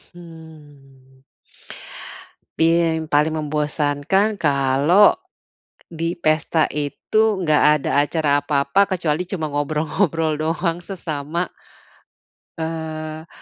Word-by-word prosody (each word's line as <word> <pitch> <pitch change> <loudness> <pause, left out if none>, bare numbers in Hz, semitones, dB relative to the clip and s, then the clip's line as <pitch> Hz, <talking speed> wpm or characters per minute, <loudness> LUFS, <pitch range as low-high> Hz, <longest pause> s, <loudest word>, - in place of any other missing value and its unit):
Hmm. 145 -6 -15 1.4
Iya, 165 0 +3
yang 160 -1 -5
paling 150 +2 +2
membosankan 150 +6 0
kalo 140 +6 +3 0.7
di 165 +1 -3
pesta 160 -1 +1
itu 150 +8 -1 0.2
nggak 155 -2 +3 0.2
ada - - -1
acara 145 -1 +1
apa-apa, 140 +4 +1 0.2
kecuali 165 -1 -1
cuma 180 -4 -3
ngobrol-ngobrol 155 +3 0
doang 165 +2 -1
sesama 170 -3 -4 1.1
Eee, 160 -1 -5
155 Hz, 85 wpm, -21 LUFS, 145-165 Hz, 1.4 s, Iya